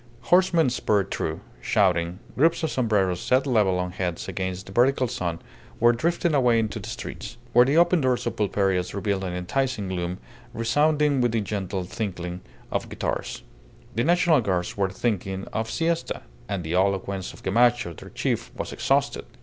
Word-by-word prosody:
Horsemen 175 Hz, -6 st, +4 dB
spurred 105 Hz, -5 st, +1 dB
through, -, -, -2 dB, 0.2 s
shouting; 90 Hz, -, +2 dB, 0.2 s
groups 165 Hz, +4 st, +3 dB
of 160 Hz, -, 0 dB
sombreros 100 Hz, -8 st, +1 dB
set 130 Hz, +2 st, +2 dB
level 105 Hz, -8 st, +3 dB
on 90 Hz, 0 st, -2 dB
heads 90 Hz, -2 st, -3 dB
against 95 Hz, 0 st, -3 dB
the -, -, -11 dB
vertical 130 Hz, +4 st, +3 dB
sun 85 Hz, -6 st, -3 dB, 0.4 s
were 120 Hz, +1 st, +6 dB
drifting 170 Hz, +6 st, 0 dB
away 125 Hz, -5 st, +4 dB
into 110 Hz, 0 st, -1 dB
the 105 Hz, +2 st, -7 dB
streets, 115 Hz, 0 st, -7 dB, 0.2 s
where 120 Hz, +1 st, +7 dB
the 140 Hz, +4 st, +2 dB
open 175 Hz, 0 st, +5 dB
doors 130 Hz, -2 st, +1 dB
of -, -, -2 dB
pulperias 95 Hz, -3 st, 0 dB
revealed 100 Hz, -1 st, -1 dB
an 90 Hz, -2 st, -3 dB
enticing 105 Hz, +3 st, -1 dB
gloom 90 Hz, -1 st, -3 dB, 0.4 s
resounding 145 Hz, +4 st, +2 dB
with 120 Hz, -2 st, +1 dB
the 115 Hz, -, +1 dB
gentle 95 Hz, -2 st, -3 dB
tinkling 90 Hz, -3 st, -4 dB, 0.3 s
of -, -, -2 dB
guitars. -, -, -3 dB, 0.5 s
The 115 Hz, -, 0 dB
National 170 Hz, -2 st, +4 dB
Guards 90 Hz, -5 st, -1 dB
were 100 Hz, -2 st, +1 dB
thinking 95 Hz, -1 st, -2 dB
of 110 Hz, 0 st, -2 dB
siesta, 165 Hz, 0 st, -1 dB, 0.3 s
and 100 Hz, -3 st, -2 dB
the 80 Hz, +1 st, -3 dB
eloquence 95 Hz, 0 st, 0 dB
of -, -, -15 dB
Gamacho, 120 Hz, -2 st, +3 dB
their -, -, -11 dB
chief, -, -, -2 dB
was -, -, -5 dB
exhausted. -, -, 0 dB
105 Hz, 165 wpm, -25 LUFS, 95-130 Hz, 0.5 s, where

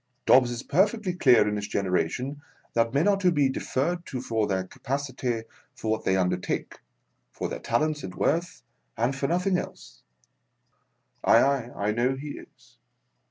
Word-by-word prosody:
Dobbs 125 Hz, -2 st, +6 dB
is 120 Hz, 0 st, -5 dB
perfectly 200 Hz, +3 st, +1 dB
clear 125 Hz, -11 st, +5 dB
in 105 Hz, 0 st, -1 dB
his 100 Hz, 0 st, -4 dB
generation 125 Hz, +9 st, -1 dB, 0.3 s
that 115 Hz, 0 st, +2 dB
men 145 Hz, +8 st, +2 dB
are 200 Hz, -1 st, +4 dB
to 185 Hz, -2 st, +3 dB
be 145 Hz, -4 st, +3 dB
deferred 155 Hz, +6 st, -1 dB
to 130 Hz, -, -4 dB
for 115 Hz, -4 st, -1 dB
their 95 Hz, -2 st, 0 dB
capacity 125 Hz, +2 st, -3 dB, 0.3 s
for 110 Hz, -, -3 dB
what 110 Hz, -, -2 dB
they 95 Hz, -, +3 dB
undertake, 90 Hz, -1 st, -2 dB, 0.5 s
for -, -, -4 dB
their -, -, -5 dB
talents 150 Hz, +5 st, 0 dB
and 90 Hz, -, -7 dB
worth, 170 Hz, +4 st, -1 dB, 0.3 s
and 120 Hz, +4 st, +1 dB
for 140 Hz, +1 st, -1 dB
nothing 180 Hz, +2 st, +1 dB
else. -, -, -9 dB, 1.2 s
Aye, -, -, +6 dB
aye, 135 Hz, -3 st, +1 dB
I 100 Hz, +1 st, 0 dB
know 120 Hz, +4 st, +1 dB
he 145 Hz, +3 st, -7 dB
is. -, -, -13 dB
130 Hz, 160 wpm, -26 LUFS, 110-150 Hz, 1.2 s, Dobbs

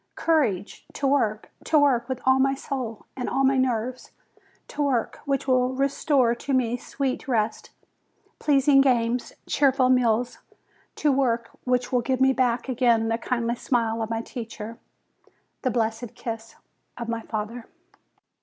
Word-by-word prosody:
Courage! 235 Hz, -, 0 dB
to 280 Hz, -, -3 dB
work! 225 Hz, -6 st, +1 dB
To 315 Hz, -, +3 dB
work 265 Hz, -4 st, +3 dB
with 260 Hz, -1 st, -3 dB
all 260 Hz, 0 st, +4 dB
my 270 Hz, +1 st, +3 dB
soul, 255 Hz, -5 st, -5 dB
and 250 Hz, -, -3 dB
all 270 Hz, -, +1 dB
my 270 Hz, 0 st, +4 dB
nerves! 255 Hz, -1 st, -1 dB, 0.6 s
To 295 Hz, -, -4 dB
work, 265 Hz, -6 st, 0 dB
which 275 Hz, -2 st, -1 dB
will 255 Hz, 0 st, +2 dB
restore 275 Hz, -2 st, +2 dB
to 270 Hz, +3 st, -4 dB
me 245 Hz, -2 st, +2 dB
sweet 265 Hz, +2 st, -3 dB
rest, 220 Hz, -4 st, -1 dB, 0.7 s
pleasing 275 Hz, -1 st, +4 dB
games, 245 Hz, -2 st, +1 dB
cheerful 270 Hz, -2 st, +3 dB
meals! 245 Hz, -1 st, +2 dB, 0.6 s
To 300 Hz, -, +2 dB
work, 240 Hz, -4 st, 0 dB
which 250 Hz, -1 st, 0 dB
will 250 Hz, -1 st, +2 dB
give 260 Hz, +1 st, -1 dB
me 265 Hz, 0 st, +4 dB
back 245 Hz, -1 st, 0 dB
again 235 Hz, -3 st, +2 dB
the 225 Hz, +1 st, 0 dB
kindly 235 Hz, -1 st, -1 dB
smile 230 Hz, -2 st, 0 dB
of 220 Hz, -, -3 dB
my 225 Hz, 0 st, -2 dB
teacher, 230 Hz, -1 st, -7 dB, 0.8 s
the 260 Hz, -, 0 dB
blessed 230 Hz, 0 st, -2 dB
kiss 225 Hz, -1 st, -6 dB, 0.4 s
of 235 Hz, -, -5 dB
my 230 Hz, 0 st, -2 dB
father 225 Hz, +2 st, -5 dB
250 Hz, 150 wpm, -25 LUFS, 230-270 Hz, 0.8 s, all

